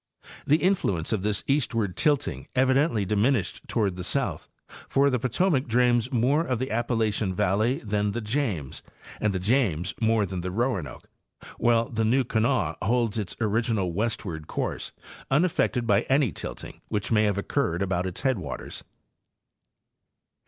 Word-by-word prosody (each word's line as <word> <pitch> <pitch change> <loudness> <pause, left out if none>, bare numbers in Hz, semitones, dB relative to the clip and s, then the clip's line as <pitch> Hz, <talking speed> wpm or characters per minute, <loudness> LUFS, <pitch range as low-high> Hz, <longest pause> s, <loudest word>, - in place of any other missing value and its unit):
'The 145 - +5
influence 140 - 0
of 105 - 0
this 105 0 -1
eastward 115 -9 0
tilting 150 -4 0
evidently 130 -3 +3
dimin 105 +8 +3
ished 95 - -7
toward 100 -5 0
the 90 - -5
south, - - -2 0.4
for 140 +1 +3
the 125 - +1
Potomac 135 +4 +1
drains 120 0 +2
more 135 +6 +2
of 130 -7 -1
the 130 +3 -3
Ap 120 +2 0
palachian 110 -5 0
valley 110 +9 +1
than 105 -1 0
the 115 - -2
James, 105 - -2 0.4
and 105 - +1
the 95 - -1
James 95 - +1
more 110 -2 +3
than 95 -2 -4
the 90 - -3
Roanoke, 100 - -2 0.5
while 115 -1 +3
the 115 -1 -1
New 125 +5 +3
Kanawha 115 - 0
holds 115 -1 +1
its 100 -4 -4
original 110 -4 0
westward 95 -6 -3
course, - - -3 0.4
unaffected 135 -5 +2
by 105 -2 +3
any 135 -5 +3
tilting - - -7
which 105 +1 -2
may 110 -1 +4
have 100 -1 +1
occurred 100 - 0
about 95 -1 -1
its 90 - -5
headwaters. 90 - -3
110 Hz, 150 wpm, -26 LUFS, 100-130 Hz, 0.5 s, The